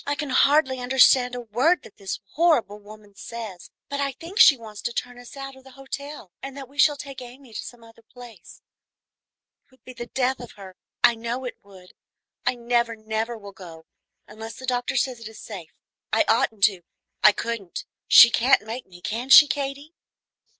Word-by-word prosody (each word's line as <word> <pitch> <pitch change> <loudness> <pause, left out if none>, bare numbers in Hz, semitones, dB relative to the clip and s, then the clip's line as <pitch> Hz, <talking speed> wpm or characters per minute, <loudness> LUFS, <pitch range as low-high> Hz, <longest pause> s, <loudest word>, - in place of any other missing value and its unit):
"I 285 - 0
can 290 -2 -5
hardly 275 -1 +3
understand 250 0 +4
a 245 - -5
word 250 +10 +1
that - - -16
this 195 -1 -5
horrible 295 -11 +1
woman 210 0 -15
says, 200 -6 -9 0.2
but 280 - -4
I 280 -1 -1
think 345 - -8
she 275 - +8
wants 215 -3 -11
to - - -3
turn 245 0 -5
us 245 +3 -13
out 275 0 -7
of 265 - -17
the 265 -1 -16
hotel, 275 -5 -8
and 270 0 -8
that 270 -2 -8
we 280 +3 -17
shall 295 -1 +4
take 275 -2 -9
Amy 250 0 -13
to - - -5
some 240 -1 -12
other 230 0 -18
place. 230 -5 -15 1.0
It - - -41
would 260 -1 -27
be 255 - -11
the 240 -1 -8
death 260 +1 -1
of 245 - -10
her, 190 -2 -12 0.3
I 240 - +6
know 235 +3 -5
it 250 - -7
would. 190 -2 -17 0.5
I - - +2
never, 235 -1 0
never 220 +2 -4
will 200 -2 -11
go, 170 -4 -13 0.4
unless 220 +1 -9
the 260 - -9
doctor 245 -1 -2
says 255 -1 -1
it 230 - -9
is 220 - -12
safe. 185 -7 -9 0.4
I - - +3
oughtn't 215 -3 +1
to, 195 -4 +3 0.4
I 210 - +9
couldn't; 210 -4 -5 0.2
she 235 - +9
can't 255 +2 +3
make 235 +3 -7
me, 175 -1 -16
can 235 +7 -4
she, 295 +2 +10
Katy?" 280 +2 -4
240 Hz, 200 wpm, -24 LUFS, 215-270 Hz, 1.0 s, she